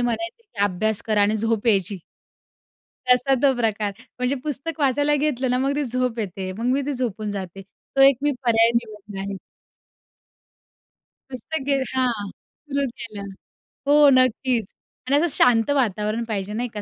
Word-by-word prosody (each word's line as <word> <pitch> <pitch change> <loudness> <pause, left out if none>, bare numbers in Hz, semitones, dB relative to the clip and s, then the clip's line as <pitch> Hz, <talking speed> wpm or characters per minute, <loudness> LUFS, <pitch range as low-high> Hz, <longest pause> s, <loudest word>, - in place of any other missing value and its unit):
म्हणायचे, 245 - -2
की 425 - -21
"अभ्यास 205 +2 0
करा" 215 -2 +3
आणि 210 +2 +2
झोप 225 +1 -1
यायची. 200 -3 +2 1.1
तसा 250 +2 +4
तो 275 -2 +4
प्रकार. 215 -3 -1 0.3
म्हणजे 250 +2 0
पुस्तक 305 +2 -4
वाचायला 290 +2 +2
घेतलं 270 -3 0
ना, 250 - +2
मग 275 +2 0
ती 295 - 0
झोप 250 -1 -1
येते, 190 -2 -4
मग 220 +5 -6
मी 280 +2 +1
ती 290 - -1
झोपून 225 -5 -3
जाते. 195 -1 -6 0.3
तो 270 - +6
एक 275 -1 +7
मी 295 0 +2
पर्याय 230 -1 +4
निवडला 210 -4 -4
आहे. 195 0 -4 2.0
मस्त, 255 +6 -5
गिर 275 -1 +1
हां. 240 -6 0 0.4
सुरू 280 0 0
केलं. 210 -3 -7 0.6
हो. 290 0 +7
नक्कीच. 255 -3 +2 0.4
आणि 275 - +3
असं 330 +4 +3
शांत 230 -1 +4
वातावरण 215 -2 0
पाहिजे, 210 -3 -4
नाही 240 +3 -2
का. 210 - -5
235 Hz, 155 wpm, -23 LUFS, 210-270 Hz, 2.0 s, एक